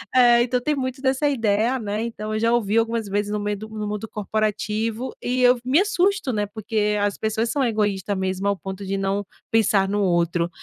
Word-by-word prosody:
eh, 240 -1 +6
então 250 +1 0
tem 300 +3 0
muito 260 -1 -3
dessa 270 +2 +1
ideia, 230 0 +1
né, 210 0 -3
então, 215 -2 -5
eu 215 - 0
já 230 +1 +2
ouvi 220 -2 +1
algumas 230 -1 0
vezes 205 +1 -1
no 210 - -1
meio 205 0 -2
do 215 +2 -9
no 215 -1 -5
mundo 210 +1 -4
corporativo 215 +3 -2
e 250 +1 0
eu 250 0 +6
v 240 - -12
me 265 +5 +4
assusto, 395 -5 +1
né, 210 -1 0
porque 210 -1 -1
as 205 -1 0
pessoas 220 +1 -1
são 285 - +1
egoísta 205 -4 0
mesmo, 190 +1 -2
ao 200 -1 +1
ponto 195 +1 -7
de 195 +1 -2
não 195 +1 -1 0.3
pensar 215 -3 +3
no 205 +1 0
outro. 170 -2 +1
215 Hz, 215 wpm, -23 LUFS, 205-240 Hz, 0.3 s, eh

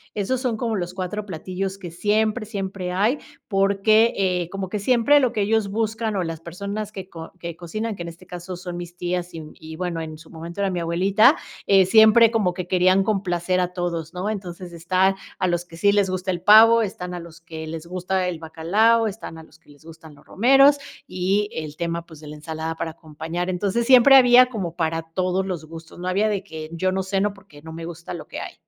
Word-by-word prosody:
Esos 245 +5 -1
son 240 -4 -1
como 230 -2 -2
los 180 -2 -4
4 195 +3 -4
platillos 190 +3 -4
que 175 -4 -8
siempre, 215 +4 0
siempre 195 -3 -4
hay, 210 +10 +1 0.3
porque, 200 +3 +3
eh, 180 -3 0
como 195 -1 -5
que 210 +2 -4
siempre 250 +6 +4
lo 255 -3 +1
que 210 - -1
ellos 210 0 +1
buscan, 220 0 -2
o 185 - 0
las 165 -1 -5
personas 200 +5 -5
que 190 -2 -8
co 165 -1 -9
que 170 -1 -6
cocinan, 215 +6 -5
que 175 - -9
en 170 - -5
este 175 +2 -14
caso 180 0 -7
son 180 -1 -7
mis 175 0 -8
tías 180 0 -3
y 160 - -6
y 160 0 -11
bueno, 175 -1 -3
en 155 -1 -7
su 160 +1 -16
momento 170 +4 -7
era 195 -1 +1
mi 180 - -2
abuelita, 185 +6 +3 0.3
eh, 195 -1 +5
siempre 220 +3 +6
como 205 -6 +1
que 180 -1 -5
querían 185 +1 +3
complacer 185 -3 0
a 180 0 0
todos, 170 -3 -3
¿no?, 185 +4 -3
entonces, 180 -3 -7
están 185 +3 +1 0.2
a 185 - 0
los 175 -1 0
que 165 -1 -13
sí 200 +4 +3
les 200 -2 +2
gusta 185 0 -2
el 175 - -4
pavo, 225 +3 +7
están 180 -3 -4
a 175 - -5
los 170 -1 -12
que 160 -1 -8
les 160 0 -6
gusta 185 +1 -2
el 170 -3 -4
bacalao, 205 +9 +2
están 195 -5 -7
a 160 - -11
los 160 0 -20
que 165 - -27
les 145 +2 -19
gustan 160 -2 -13
los - - -21
romeros 275 +6 +5 0.3
y 195 +3 0
el 155 -1 -6
tema, 170 0 -3
pues, 160 -3 -14
de 155 - -12
la 150 - -8
ensalada 160 +1 -5
para 160 - -4
acompañar. 160 +2 -6
Entonces, 200 +5 -1
siempre 260 +2 +7
había 250 -1 +7
como 185 -8 -5
para 165 -1 -1
todos 185 +3 -1
los 175 -5 -5
gustos, 165 +1 -12
no 180 - -5
había 200 +4 +1
de 200 -2 -2
que 160 -4 -8
yo 185 +3 0
no 190 0 -1
ceno, 195 +1 -1
porque 190 -7 -17
no 160 +1 -10
me 165 0 -7
gusta 170 +1 -8
lo 160 - -9
que - - -7
hay. - - -7
185 Hz, 225 wpm, -23 LUFS, 170-205 Hz, 0.3 s, pavo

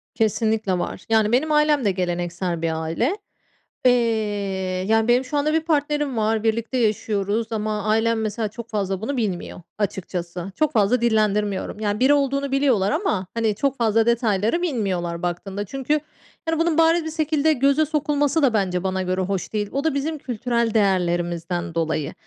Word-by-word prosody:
Kesinlikle 220 -3 +1
var. 175 - -5
Yani, 220 -1 +3
benim 300 +6 +2
ailem 300 -3 +3
de 200 - +3
geleneksel 175 -1 -2
bir 160 -1 -1
aile. 235 - -1 0.7
Eee, 250 - +8 1.0
yani, 225 0 +3
benim 245 +2 +3
şu 290 +3 -2
anda 305 +2 +1
bir 320 - +2
partnerim 295 -4 0
var, 220 0 +1
birlikte 230 +3 0
yaşıyoruz 215 -1 0
ama 215 -1 -2
ailem 225 +1 +1
mesela 215 +1 -2
çok 235 +2 -9
fazla 195 -2 -2
bunu 275 +4 -3
bilmiyor, 190 -5 -3 0.2
açıkçası. 180 -3 -4
Çok 310 -1 +1
fazla 225 +3 +3
dillendirmiyorum. 210 -3 0
Yani, 210 -1 -1
biri 265 +3 +5
olduğunu 275 -1 0
biliyorlar 260 -8 +2
ama, 295 - -1
hani, 225 -2 0
çok 275 +4 -1
fazla 225 -2 +2
detayları 230 - +1
bilmiyorlar 190 - -2
baktığında. 190 +3 -3
Çünkü, 270 +7 -1 0.5
yani, 325 0 0
bunun 330 -1 +1
bariz 330 0 +4
bir 320 - -3
şekilde 310 -1 +1
göze 280 +3 +3
sokulması 295 0 +1
da 265 -5 +3
bence 185 -4 0
bana 190 0 -1
göre 185 +1 -1
hoş 190 +1 -3
değil. 210 -1 -1
O 275 - -2
da 320 -2 +1
bizim 300 +3 -2
kültürel 235 -3 -1
değerlerimizden 175 -3 0
dolayı. 160 -3 -1
220 Hz, 165 wpm, -22 LUFS, 195-275 Hz, 1.0 s, Eee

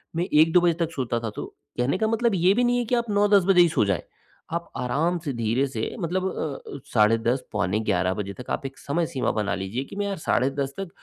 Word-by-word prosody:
मैं 170 - +1
1-2 160 +3 +6
बजे 175 -1 +3
तक 165 - -10
सोता 120 -3 -1
था, 115 - -3
तो - - -6 0.3
कहने 125 +8 +1
का 220 - +2
मतलब 225 -1 +1
ये 180 +2 +4
भी 245 - +2
नहीं 245 0 +2
है 240 - -1
कि 245 - +1
आप 235 -1 -1
9-10 205 -1 +4
बजे 190 -2 +6
ही 175 - +5
सो 110 - +2
जाए। 100 -3 0 0.5
आप 170 0 -3
आराम 155 +8 0
से 155 -3 -4
धीरे 115 +3 +1
से 115 -5 -4
मतलब 185 +1 -1 0.5
अ, - - -7
साढ़े 110 0 +5
10 120 +3 0
पौने 105 0 0
11 95 -4 +1
बजे 100 -1 -4
तक 125 - -10
आप - - -2
एक 135 - -13
समय 165 +4 -1
सीमा 130 -4 -1
बना 105 -2 -1
लीजिए, 100 +7 -3
कि 195 - -11
मैं 205 - -1
यार 200 -1 -3
साढ़े 135 -4 +1
10 140 0 -1
तक 195 -2 -4
140 Hz, 250 wpm, -25 LUFS, 115-185 Hz, 0.5 s, 1-2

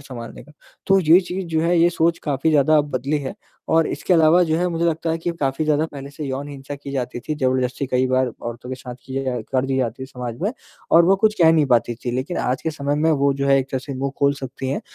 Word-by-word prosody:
सँभालने 125 -4 -9
का। 150 - -18 0.3
तो 195 0 +5
ये 170 +2 +6
चीज़ 180 0 -5
जो 160 - +3
है 170 0 +2
ये 170 +1 +5
सोच 170 0 +1
काफ़ी 145 +1 0
ज़्यादा 155 +1 +4
अब 145 0 -1
बदली 135 +4 -1
है 135 -2 -5 0.4
और 165 -1 +4
इसके - - -2
अलावा 165 +2 +5
जो 160 -1 +1
है 180 - +1
मुझे 170 0 -1
लगता 165 0 0
है 165 - -1
कि 175 - -2
काफ़ी 135 +3 0
ज़्यादा 155 0 +2
पहले 140 -2 -9
से 150 +1 -7
यौन 135 +2 -4
हिंसा 140 0 -8
की 140 0 -9
जाती 125 -2 -3
थी, 155 - -4
ज़बरदस्ती 130 -1 0
कई 130 0 +1
बार 130 0 +1
औरतों 120 +1 -6
के - - -2
साथ 125 -1 -9
की 135 +1 -4
जा 125 -2 -2
कर 130 0 +2
दी 135 0 -1
जाती 130 +1 -2
समाज 125 -2 -7
में 200 - 0 0.4
और 170 +1 +7
वो 195 +2 +4
कुछ 215 +1 +2
कह 160 0 +7
नहीं 155 -3 +3
पाती 120 -2 +2
थी। 120 +1 -5
लेकिन 145 +8 -3
आज 130 +1 -1
के 160 - -1
समय 145 -1 -2
में 160 +2 +2
वो 140 -2 +2
जो 140 0 -2
है, 135 0 +5
एक 130 - -1
तरह 130 - -1
से 140 +1 -7
मुँह 135 +1 -3
खोल 140 0 +3
सकती 135 -1 -6
हैं 135 - -2
140 Hz, 270 wpm, -21 LUFS, 130-160 Hz, 0.4 s, और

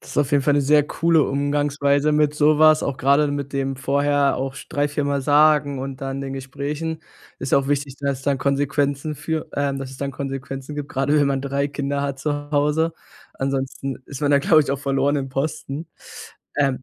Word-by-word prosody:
Das - - -11
auf 145 0 +1
jeden 145 - +4
Fall 145 - +3
'ne 145 - +3
sehr 150 +2 +4
coole 165 -1 +2
Umgangsweise 145 +1 +1
mit 150 0 +2
so 150 0 +3
was, 155 0 +6
auch 140 -2 -2
grade 140 +3 +3
mit 140 -1 -4
dem 135 0 -1
vorher 140 +1 +1
auch 135 0 -3
drei, 145 0 0
viermal 140 -1 -1
sagen 145 -1 +4
und 135 +1 -6
dann 135 0 -3
den 135 0 -5
Gesprächen. 145 +4 -4 0.4
Ist 135 - -5
ja - - +6
auch 135 - -3
wichtig, 145 -1 -1
dass 140 -2 -1
es 135 - -13
dann 140 -1 +1
Konsequenzen 140 +2 0
für, 160 +2 -3
ähm 140 -1 0
dass 135 -1 -6
es 135 - -10
dann 140 0 -3
Konsequenzen 135 +1 -6
gibt, 145 -1 -5
grade 135 +3 +1
wenn 145 - +3
man 135 -1 0
3 140 +1 -1
Kinder 140 0 -2
hat 140 -1 -3
zu 145 +1 -3
Hause. 150 +3 +1 0.4
Ansonsten 135 0 -3
ist 140 -1 -8
man 145 - +1
da, 140 - +5
glaube 155 +2 +5
ich, 140 - -4
auf 140 0 -2
verlorenem 140 0 0
Posten. 145 +2 -3 0.7
Ähm, 135 -2 +1
140 Hz, 205 wpm, -22 LUFS, 135-145 Hz, 0.7 s, was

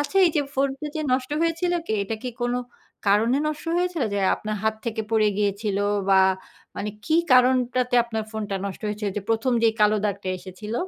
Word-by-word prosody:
আচ্ছা 290 +6 -3
এই - - +3
যে - - +4
ফোনটা 275 +2 -1
যে - - -1
নষ্ট 255 +1 0
হয়েছিল 335 +2 0
কে - - -2
এটা 210 +3 -3
কি 255 - -3
কোনো 245 +1 0 0.5
কারণে 215 +5 +4
নষ্ট 305 +1 -3
হয়েছিল? 355 -3 0
যে - - 0 0.2
আপনার 215 0 -4
হাত 220 - +2
থেকে 225 -2 -2
পড়ে 215 -2 +3
গিয়েছিল 205 0 0 0.3
বা 195 -1 +6 0.6
মানে 210 - -3
কি 315 - +1 0.2
কারণটাতে 250 0 +3
আপনার 220 -2 -3
ফোনটা 210 -2 -3
নষ্ট 195 - -6
হয়েছে? 210 +1 -4
ওইযে 200 +1 -4
১ম 225 +3 +1
যে 230 - +6
কালো 210 0 +5
দাগটা 200 -2 -2
এসেছিল? 190 +4 -8
225 Hz, 190 wpm, -24 LUFS, 210-260 Hz, 0.6 s, বা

